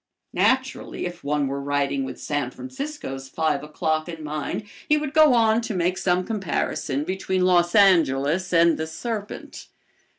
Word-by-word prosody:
Naturally, 260 -6 0
if 175 0 -7
one 145 0 0
were 140 +1 -3
writing 140 -1 0
with - - -7
San 145 -4 -2
Francisco's 260 - -7
five 155 -2 0
o'clock 155 +2 -2
in 165 -2 -7
mind 150 +6 -3 0.3
he 300 - +5
would 300 -1 -3
go 310 -4 +6
on 225 0 +3
to 230 -3 -4
make 180 +1 +1
some 180 -1 +1
comparison 160 - -2
between 185 +1 -1
Los 175 0 +3
Angeles 175 -3 +4
and 170 -1 +4
the 160 - -2
serpent. 205 +6 -6
175 Hz, 155 wpm, -24 LUFS, 150-215 Hz, 0.3 s, go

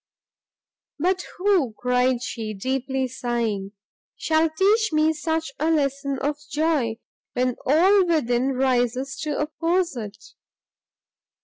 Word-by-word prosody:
"But 360 +4 0
who," 360 - +2
cried 250 0 +1
she, 220 -4 -4
deeply 265 +4 -1
sighing, 230 -6 -2 0.4
"shall 320 0 +2
teach 410 +7 +2
me 310 +1 +3
such 320 0 -2
a 310 +2 +1
lesson 280 -3 0
of 290 +1 -1
joy, 295 -7 +1 0.4
when 250 0 0
all 365 +7 +5
within 265 -5 +1
rises 255 0 0
to 300 -2 -2
oppose 330 +3 0
it?" 215 -3 -6
275 Hz, 110 wpm, -24 LUFS, 250-320 Hz, 0.4 s, all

